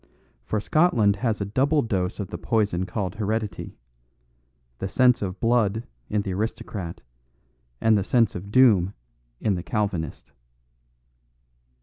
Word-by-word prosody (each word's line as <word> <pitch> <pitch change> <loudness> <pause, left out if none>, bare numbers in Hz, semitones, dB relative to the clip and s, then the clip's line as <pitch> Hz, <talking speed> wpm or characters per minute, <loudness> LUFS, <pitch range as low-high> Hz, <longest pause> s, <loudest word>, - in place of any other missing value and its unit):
For 110 - -1
Scotland 110 - +3
has 110 -1 -1
a - - 0
double 135 +8 +2
dose 95 -4 -2
of 100 - -4
the - - -5
poison 100 -5 0
called 95 -1 -3
heredity; 105 -3 -3 1.0
the 95 - -2
sense 125 +4 +4
of 95 -1 -4
blood 115 -2 +1 0.2
in 105 -1 0
the 95 - -3
aristocrat, 95 -3 -4 0.8
and 110 -1 +4
the 100 - +2
sense 115 +1 +2
of 95 +3 -7
doom 105 -7 +5 0.4
in 105 - +1
the 90 - -2
Calvinist. 100 - -3
105 Hz, 130 wpm, -25 LUFS, 95-115 Hz, 1.0 s, doom